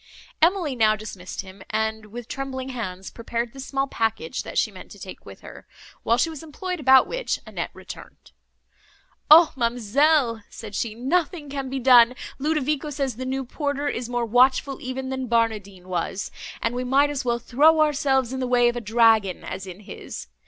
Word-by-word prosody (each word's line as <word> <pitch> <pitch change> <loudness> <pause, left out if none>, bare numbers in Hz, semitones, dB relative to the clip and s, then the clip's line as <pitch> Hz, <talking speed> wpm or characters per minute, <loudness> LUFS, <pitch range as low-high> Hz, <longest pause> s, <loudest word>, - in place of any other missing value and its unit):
Emily 335 -4 +2
now 215 -2 +4
dismissed 200 -4 -7
him; 190 0 -13
and, 220 0 -2
with 235 +2 -8
trembling 265 -1 -5
hands, 190 -7 -6
prepared 235 0 -4
the 270 - -11
small 270 +1 -1
package, 225 - -2
that - - -7
she - - +2
meant - - -12
to - - -12
take - - -10
with - - -12
her; - - -12 0.3
while 235 - +2
she 330 - +2
was 310 - -8
employed 360 +3 -5
about 265 -2 +6
which - - -2
Annette - - -4
returned. - - -12 1.0
"O 320 +2 +8
ma'amselle!" 245 +1 +2
said 215 -2 -9
she, 215 +1 -2
"nothing 295 - -1
can 275 -2 -4
be 270 - -3
done! 250 -1 +6 0.2
Ludovico 300 0 0
says 275 -4 -3
the 255 - -5
new 265 0 -2
porter 285 +2 -2
is 245 -3 -3
more 240 -1 -1
watchful 255 +3 +3
even 260 +1 -4
than 260 -1 -3
Barnardine 210 -5 -1
was, 185 +2 -3 0.3
and 230 - 0
we 250 +1 -2
might 275 +3 +3
as 285 -1 -3
well 240 -1 0
throw 295 +7 +4
ourselves 270 -4 +2
in 265 - -3
the 255 - -1
way 245 -1 +4
of 240 - -3
a 240 - -3
dragon, 220 -4 +3
as 190 +1 -6
in 185 +2 -9
his. 200 - -8
250 Hz, 185 wpm, -24 LUFS, 225-280 Hz, 1.0 s, O